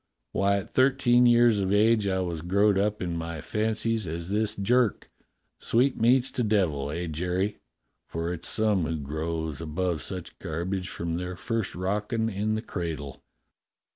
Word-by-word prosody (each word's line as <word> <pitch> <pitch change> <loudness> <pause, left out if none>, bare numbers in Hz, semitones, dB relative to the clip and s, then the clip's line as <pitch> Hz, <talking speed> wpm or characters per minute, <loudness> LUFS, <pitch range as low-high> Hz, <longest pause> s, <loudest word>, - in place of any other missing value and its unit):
Why, 100 0 +2
at 100 - -6
thirteen 130 -2 +4
years 120 -2 +5
of 95 -1 0
age 105 0 +4
I 95 -1 +1
was 85 -3 -3
as 85 - -9
growed 100 +2 +4
up 105 +1 0
in 85 -1 -2
my 85 -1 -4
fancies 110 +3 -1
as 85 +3 -5
this 105 +1 +1
Jerk. 115 +2 +1 0.5
Sweetmeats 125 +1 +3
to - - -2
devil, 90 -10 +1
eh, 85 +4 -3
Jerry 90 +5 -1
.'^ 105 - -17 0.5
for 85 +1 -3
it's 85 - -4
some 105 -6 +2
who 80 0 -2
grows 80 +1 -3
above 85 +1 -2
such 90 -3 -7
garbage 90 +3 -3
from 85 0 -3
their 90 0 -4
first 115 +2 -3
rocking 105 +5 -1
in 105 +1 -1
the 110 - -3
cradle. 80 -7 -5
95 Hz, 165 wpm, -27 LUFS, 85-110 Hz, 0.5 s, years